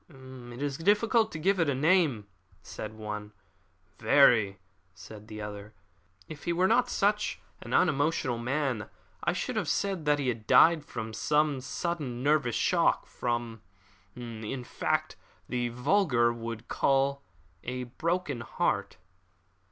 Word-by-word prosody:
"It 130 -2 -10
is 140 0 -3
difficult 220 +5 +3
to - - -5
give 190 +4 +1
it 165 -3 +2
a 140 - +1
name," 150 - +2 0.4
said 110 0 -7
one. 105 -1 -6 0.7
"Very," 110 -4 +5 0.4
said 105 -1 -12
the 105 -1 -7
other. 105 +1 -8 0.5
"If 155 - -10
he 170 - +1
were 180 +2 +3
not 240 +4 +3
such 210 +1 0 0.2
an - - -9
unemotional 145 -6 +1
man, 130 -3 -2 0.3
I - - +1
should - - -3
have - - -1
said 190 -6 -1
that 150 0 +3
he 140 -3 -1
had 115 -3 -4
died 165 -2 +6
from 110 -5 -6
some 150 +5 +1
sudden 140 -5 -4
nervous 140 -5 +2
shock - - +2
from, 120 -2 -3 0.5
in 120 +1 -6
fact, - - -2 0.3
what - - -36
the 120 -1 0
vulgar 125 -2 +2
would 115 0 -7
call 140 0 +1 0.4
a 125 +1 -4
broken 160 +2 -2
heart." - - -1
130 Hz, 140 wpm, -29 LUFS, 115-155 Hz, 0.7 s, died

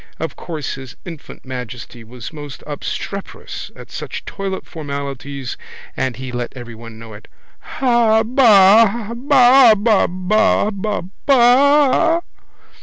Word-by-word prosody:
Of 160 - -4
course 155 -5 -6
his 130 -2 -10
infant 165 -6 -11
majesty 125 -2 -8
was 120 +4 -10
most 145 -4 -9
obstreperous 190 +6 -6
at - - -13
such - - -7
toilet 195 -1 -5
formalities 140 -3 -6 0.4
and 130 -2 -2
he 130 0 -7
let 120 -1 -5
everyone 115 -2 -10
know 115 -1 -11
it: 105 - -13 0.5
—Habaa 225 -3 +4
baaaahabaaa 220 -5 +3 0.6
baaaa. 280 +5 +4
185 Hz, 100 wpm, -18 LUFS, -, 0.6 s, Habaa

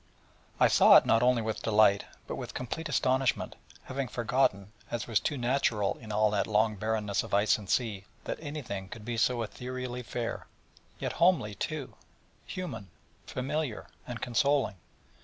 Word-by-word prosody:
I - - +7
saw - - +8
it - - +4
not 115 - +4
only 125 -2 +3
with 110 0 -3
delight, 105 -2 +4 0.2
but - - -5
with - - -7
complete 155 +6 -4
astonishment: 130 -2 +1 0.3
having 135 0 -3
forgotten, 110 -4 0 0.2
as 120 - -3
was 110 -4 +2
too 145 - -2
natural 120 -5 +1
in 110 -2 -9
all 105 0 +3
that 100 -1 0
long 110 0 +2
barrenness 105 0 -1
of - - -2
ice 105 +1 +3
and 100 -3 -11
sea, 105 -6 0 0.2
that - - -4
anything 135 -11 -5
could 110 -1 -9
be 120 0 -2
so 115 +1 +2
ethereally 125 +2 -5
fair: 120 -1 -4 0.5
yet - - -3
homely, 165 - +4
too, 145 - -4 0.5
human, 160 - -6 0.4
familiar, 135 -2 -3 0.2
and 120 -3 -6
consoling. 135 -2 +1
115 Hz, 160 wpm, -30 LUFS, 105-130 Hz, 0.5 s, saw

